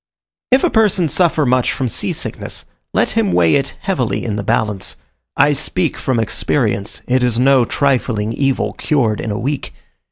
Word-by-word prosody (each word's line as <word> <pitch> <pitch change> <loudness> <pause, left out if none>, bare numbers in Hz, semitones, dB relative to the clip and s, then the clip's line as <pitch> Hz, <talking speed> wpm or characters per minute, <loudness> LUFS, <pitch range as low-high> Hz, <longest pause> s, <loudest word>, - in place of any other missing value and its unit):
If 260 +1 +4
a - - +2
person 210 -6 +3
suffer 160 -2 +2
much 125 -1 +2
from 130 - -2
sea 115 - -1
sickness, - - -5 0.3
let - - +1
him 105 -5 +1
weigh 85 -2 +4
it - - 0
heavily - - -1
in 105 - -2
the 105 - -2
balance. 105 -1 -1 0.4
I 145 +2 +4
speak 170 +4 -1
from 130 -3 -1
experience: 110 -2 -1
it 130 +1 +2
is 120 -2 +1
no 130 0 +4
trifling 115 -6 0
evil, 135 +1 0
cured 120 -8 0
in 115 - -4
a 105 - -2
week. 135 +4 -4
125 Hz, 170 wpm, -17 LUFS, 110-145 Hz, 0.4 s, If